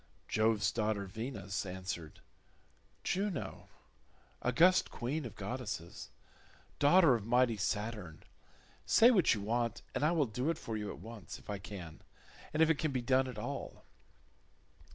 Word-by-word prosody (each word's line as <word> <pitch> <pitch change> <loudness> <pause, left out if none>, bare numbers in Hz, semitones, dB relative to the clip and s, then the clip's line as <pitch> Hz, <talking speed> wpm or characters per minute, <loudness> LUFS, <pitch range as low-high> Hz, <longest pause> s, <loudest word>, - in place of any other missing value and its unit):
Jove's 110 -1 +2
daughter 105 -3 -1
Venus 110 0 -4
answered, 90 -3 -6 0.8
"Juno, 190 -6 -2 0.7
august 170 +9 +4
queen 135 +5 -3
of 115 - -7
goddesses, 105 -5 -5 0.7
daughter 150 0 +6
of 115 -4 -1
mighty 120 -1 +3
Saturn, 105 -4 -3 0.6
say 235 +2 +7
what 185 - +4
you 105 - -4
want, 115 +2 -1
and - - -1
I 155 - +4
will 160 -4 +3
do 125 +6 -2
it 165 - 0
for 115 -8 -5
you 105 -1 -3
at - - -6
once, 115 -4 -9
if - - -9
I 100 - -3
can, 90 -5 -9 0.5
and 155 +1 +4
if 160 - +3
it 150 - 0
can 155 -2 0
be 130 -2 -1
done 130 +1 +3
at 125 -4 -7
all." 105 - -6
115 Hz, 150 wpm, -34 LUFS, 105-140 Hz, 0.8 s, say